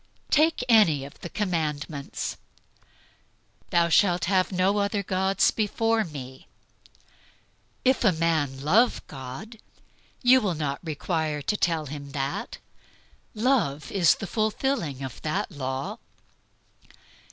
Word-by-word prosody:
Take 315 Hz, -2 st, +3 dB
any 175 Hz, -, +5 dB
of 140 Hz, -, -13 dB
the 175 Hz, -, -6 dB
commandments. 155 Hz, -7 st, -3 dB, 1.3 s
"Thou 170 Hz, 0 st, +3 dB
shalt 175 Hz, 0 st, +3 dB
have 185 Hz, +1 st, +2 dB
no 190 Hz, +2 st, +2 dB
other 200 Hz, 0 st, 0 dB
gods 190 Hz, +1 st, +2 dB
before 225 Hz, +1 st, +1 dB
Me." 130 Hz, -6 st, -9 dB, 1.4 s
If 260 Hz, 0 st, +3 dB
a 210 Hz, -, +5 dB
man 160 Hz, -5 st, 0 dB
love 210 Hz, -, +3 dB
God, 135 Hz, -, -9 dB, 0.6 s
you 255 Hz, +1 st, +6 dB
will 190 Hz, -6 st, -1 dB
not 145 Hz, -2 st, -2 dB
require 155 Hz, -2 st, -2 dB
to 210 Hz, -, 0 dB
tell 165 Hz, -5 st, 0 dB
him 140 Hz, 0 st, -8 dB
that. 140 Hz, 0 st, -3 dB, 0.8 s
Love 210 Hz, -, +1 dB
is 180 Hz, -4 st, +4 dB
the -, -, -6 dB
fulfilling 215 Hz, -, -1 dB
of 130 Hz, -3 st, -7 dB
that 190 Hz, +7 st, -2 dB
law. 130 Hz, -3 st, -4 dB
170 Hz, 115 wpm, -26 LUFS, 145-210 Hz, 1.4 s, you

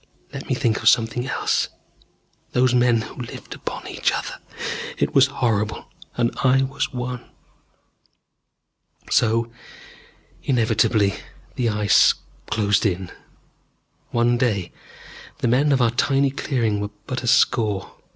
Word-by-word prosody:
Let -, -, -7 dB
me -, -, +2 dB
think 110 Hz, -2 st, 0 dB
of -, -, +6 dB
something 120 Hz, +2 st, +1 dB
else. -, -, 0 dB, 0.8 s
Those 125 Hz, 0 st, +3 dB
men 120 Hz, -2 st, +3 dB
who 110 Hz, -, -8 dB
lived 120 Hz, -, -8 dB
upon -, -, -6 dB
each -, -, 0 dB
other -, -, -4 dB, 0.6 s
it -, -, 0 dB
was 135 Hz, -1 st, +6 dB
horrible. 110 Hz, -6 st, -1 dB, 0.3 s
And 120 Hz, -1 st, +1 dB
I 135 Hz, 0 st, +4 dB
was 135 Hz, +3 st, -2 dB
one. 125 Hz, -1 st, -5 dB, 1.8 s
So 115 Hz, 0 st, +2 dB, 0.9 s
inevitably 110 Hz, -4 st, +2 dB, 0.4 s
the 120 Hz, -2 st, 0 dB
Ice 105 Hz, -2 st, +4 dB, 0.3 s
closed 100 Hz, -2 st, +2 dB
in.... 95 Hz, -3 st, -1 dB, 1.0 s
One 120 Hz, 0 st, +2 dB
day 105 Hz, -8 st, 0 dB, 0.7 s
the -, -, -1 dB
men 135 Hz, +5 st, +3 dB
of 135 Hz, -3 st, +3 dB
our 115 Hz, -, +3 dB
tiny 135 Hz, +2 st, +2 dB
clearing 120 Hz, -7 st, -1 dB
were 105 Hz, 0 st, -3 dB, 0.2 s
but 130 Hz, -2 st, -3 dB
a 120 Hz, -, -5 dB
score. 105 Hz, -4 st, +2 dB
120 Hz, 125 wpm, -22 LUFS, 110-125 Hz, 1.8 s, of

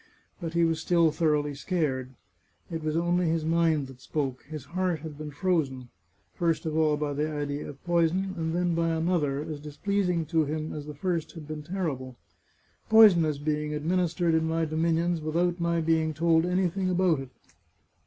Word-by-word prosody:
But 165 Hz, -3 st, -5 dB
he 170 Hz, -, +4 dB
was 165 Hz, -1 st, +1 dB
still 170 Hz, -2 st, +3 dB
thoroughly 150 Hz, -2 st, +1 dB
scared. 135 Hz, -5 st, -2 dB, 0.6 s
It 165 Hz, -1 st, -4 dB
was 155 Hz, +1 st, 0 dB
only 175 Hz, +1 st, +1 dB
his 160 Hz, -1 st, 0 dB
mind 165 Hz, -3 st, +2 dB
that 130 Hz, -1 st, -13 dB
spoke; 135 Hz, -4 st, -3 dB
his 155 Hz, -4 st, -7 dB
heart 180 Hz, -2 st, -1 dB
had 155 Hz, -2 st, -7 dB
been 150 Hz, +1 st, -7 dB
frozen 140 Hz, -6 st, -1 dB, 0.2 s
— 100 Hz, 0 st, -42 dB
first 165 Hz, -2 st, +1 dB
of 155 Hz, -1 st, -2 dB
all 155 Hz, -2 st, +3 dB
by 145 Hz, -1 st, -2 dB
the 150 Hz, +2 st, -1 dB
idea 145 Hz, -1 st, -3 dB
of 140 Hz, -, -12 dB
poison, 175 Hz, +2 st, +1 dB
and 160 Hz, 0 st, -2 dB
then 175 Hz, -1 st, +1 dB
by 165 Hz, 0 st, +1 dB
another, 160 Hz, -4 st, 0 dB
as 155 Hz, -2 st, -6 dB
displeasing 175 Hz, +3 st, -1 dB
to 160 Hz, 0 st, +2 dB
him 155 Hz, +1 st, -3 dB
as 150 Hz, -1 st, -6 dB
the 150 Hz, -, -7 dB
first 165 Hz, 0 st, -2 dB
had 160 Hz, -4 st, -9 dB
been 155 Hz, -1 st, -5 dB
terrible, 150 Hz, -7 st, -4 dB, 0.4 s
" -, -, -38 dB
Poison 215 Hz, -6 st, +8 dB
is 150 Hz, -2 st, -1 dB
being 150 Hz, +1 st, -2 dB
administered 170 Hz, +2 st, +1 dB
in 160 Hz, 0 st, +2 dB
my 165 Hz, 0 st, 0 dB
dominions 165 Hz, +2 st, 0 dB
without 170 Hz, +3 st, 0 dB
my 170 Hz, 0 st, +1 dB
being 160 Hz, -1 st, +1 dB
told 165 Hz, +1 st, +3 dB
anything 185 Hz, +1 st, 0 dB
about 180 Hz, -4 st, +2 dB
it. 135 Hz, -1 st, -7 dB
160 Hz, 185 wpm, -28 LUFS, 150-170 Hz, 0.6 s, Poison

